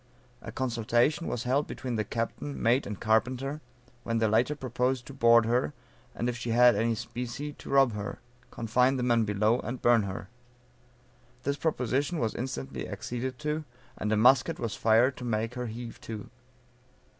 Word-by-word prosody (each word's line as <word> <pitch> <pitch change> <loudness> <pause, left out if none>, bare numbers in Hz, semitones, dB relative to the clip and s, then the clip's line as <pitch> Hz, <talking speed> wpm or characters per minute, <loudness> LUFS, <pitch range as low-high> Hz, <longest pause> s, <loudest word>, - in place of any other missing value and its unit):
A - - -7
consultation 120 +5 +1
was 120 - -2
held 135 +4 +1
between 125 -2 -4
the 110 - 0
captain, 115 +6 -4
mate 120 +4 +2
and 105 -1 -5
carpenter, 125 +6 0 0.4
when 115 -1 -1
the 110 -1 +2
latter 120 +7 +2
proposed 125 -1 -1
to 140 - -10
board 115 -3 +5
her, 115 -9 +1 0.4
and 120 - -2
if 125 - -1
she 120 0 -5
had 120 0 +6
any 115 +2 +1
specie 120 +6 -5
to - - -12
rob 135 -4 +4
her, 105 -1 -5 0.3
confine 125 +4 +1
the 125 - -1
men 120 -2 +3
below, 105 +3 +2
and 120 +1 -5
burn 120 -2 +5
her. 100 -1 -5 1.2
This 140 +1 0
proposition 145 +1 0
was 115 -6 0
instantly 115 - -5
acceded 125 +1 -4
to, 150 +1 -1 0.3
and 105 - -2
a 110 - +3
musket 125 +5 +4
was 115 -3 -3
fired 115 +4 +3
to - - -8
make 115 0 -1
her 125 -1 -4
heave 115 +1 -7
to. 110 -3 -7
120 Hz, 170 wpm, -29 LUFS, 115-130 Hz, 1.2 s, had